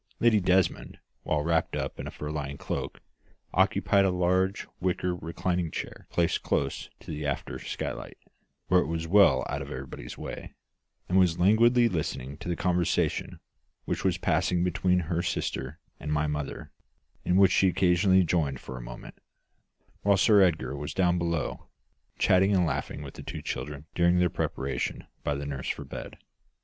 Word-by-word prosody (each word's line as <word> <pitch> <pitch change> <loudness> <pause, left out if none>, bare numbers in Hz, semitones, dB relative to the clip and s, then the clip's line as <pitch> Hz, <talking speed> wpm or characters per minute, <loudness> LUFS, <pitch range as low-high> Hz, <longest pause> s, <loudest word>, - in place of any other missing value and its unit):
Lady 115 -3 +5
Desmond, 90 -1 +1 0.3
well 75 -1 0
wrapped 80 0 +1
up - - -4
in - - -5
a - - -4
fur 75 0 -6
lined 70 -2 -4
cloak, - - -4 0.5
occupied 100 -1 +3
a 95 - +3
large 90 +1 +1
wicker 90 0 0
reclining 85 +1 -2
chair - - -6
placed 85 -1 +1
close 70 -1 -1
to - - -9
the 75 0 -4
after 70 -1 -3
skylight, - - -5 0.5
where 90 - +5
it - - -2
was 80 0 -3
well 95 -7 +5
out 70 - -3
of 70 - -7
everybody's 65 -1 -7
way, - - -7 0.5
and 95 +2 +3
was 90 -3 +3
languidly 115 +6 +5
listening 70 - -3
to 80 - -7
the 85 - 0
conversation 90 0 0 0.5
which - - -2
was - - +2
passing 90 -1 +1
between 90 0 +2
her 85 +1 -1
sister 70 -3 -3 0.2
and 75 - -4
my 75 0 +1
mother, 75 -1 -4 0.5
in 90 - +1
which 95 0 +6
she 95 - +4
occasionally 95 +1 +4
joined 80 -6 0
for 65 - -8
a - - -7
moment; - - -10 0.8
while 100 -1 +4
Sir 105 +1 +6
Edgar 85 -6 +2
was 75 +2 -5
down 90 -2 +2
below, 85 -4 -2 0.5
chatting 95 +2 +4
and 90 -2 +3
laughing 75 -2 -3
with 70 - -8
the - - -9
two - - -7
children 75 0 -5
during 85 0 +3
their 90 -2 +3
preparation 70 0 -3 0.2
by 75 - 0
the 70 +1 -4
nurse 70 -2 -4
for - - -3
bed. - - -8
85 Hz, 170 wpm, -28 LUFS, 75-90 Hz, 0.8 s, which